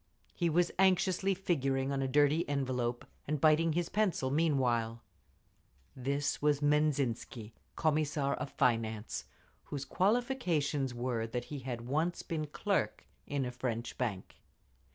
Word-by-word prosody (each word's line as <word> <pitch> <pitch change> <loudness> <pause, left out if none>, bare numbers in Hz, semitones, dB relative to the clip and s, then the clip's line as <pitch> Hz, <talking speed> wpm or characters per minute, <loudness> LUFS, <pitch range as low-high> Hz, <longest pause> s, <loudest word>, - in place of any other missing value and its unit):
He 170 -2 0
was 175 +2 +2
anxiously 190 0 +3
figuring 135 -7 0
on 135 -1 0
a 135 - 0
dirty 145 +4 +3
envelope, 125 -4 -1 0.2
and 150 0 -1
biting 155 +2 +4
his 175 +1 0
pencil 190 -11 +1
meanwhile. 125 -7 +1 0.9
This 140 +2 -1
was 145 -1 +3
Menzhinsky, 140 -7 0 0.2
Commissar 150 -3 +1
of - - -4
Finance, 115 -5 0 0.4
whose 140 -2 -5
qualifications 180 - +1
were 120 -2 -1
that 120 +1 -3
he 145 - -3
had 125 -2 -5
once 155 +8 -1
been 155 -3 -3
clerk 145 - -1 0.2
in 140 -2 -1
a 125 - -3
French 125 -2 -3
bank…. 105 -7 -3
140 Hz, 130 wpm, -33 LUFS, 125-160 Hz, 0.9 s, biting